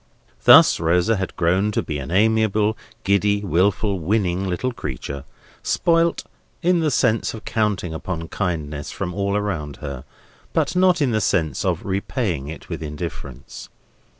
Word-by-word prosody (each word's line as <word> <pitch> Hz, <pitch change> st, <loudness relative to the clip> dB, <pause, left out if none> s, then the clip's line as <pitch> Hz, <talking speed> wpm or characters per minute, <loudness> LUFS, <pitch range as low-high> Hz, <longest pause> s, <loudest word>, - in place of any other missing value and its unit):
Thus -, -, +8 dB
Rosa 90 Hz, +6 st, +2 dB
had 95 Hz, -2 st, -4 dB
grown 95 Hz, +5 st, +2 dB
to -, -, 0 dB
be 75 Hz, -2 st, -4 dB
an 65 Hz, -, -6 dB
amiable, 110 Hz, +2 st, +2 dB, 0.3 s
giddy, 100 Hz, +1 st, +2 dB
wilful, 100 Hz, +2 st, +1 dB
winning 95 Hz, +1 st, 0 dB
little 110 Hz, +9 st, -1 dB
creature; 70 Hz, -, -6 dB, 0.4 s
spoilt, 170 Hz, -1 st, +1 dB, 0.4 s
in 175 Hz, 0 st, +3 dB
the 160 Hz, -2 st, +1 dB
sense 115 Hz, -4 st, +1 dB
of 110 Hz, -, -11 dB
counting 105 Hz, -6 st, -1 dB
upon 80 Hz, 0 st, -5 dB
kindness 75 Hz, -6 st, -3 dB
from 90 Hz, -, -4 dB
all 100 Hz, +1 st, 0 dB
around 85 Hz, -9 st, -3 dB
her; 70 Hz, -3 st, -6 dB, 0.5 s
but -, -, 0 dB
not 180 Hz, -3 st, +4 dB
in 130 Hz, -, +1 dB
the 110 Hz, -1 st, +1 dB
sense 80 Hz, -6 st, 0 dB
of 90 Hz, -4 st, -1 dB
repaying 95 Hz, -, -2 dB
it 80 Hz, -, -8 dB
with -, -, -5 dB
indifference. 75 Hz, -4 st, -7 dB
95 Hz, 150 wpm, -22 LUFS, 80-110 Hz, 0.5 s, Thus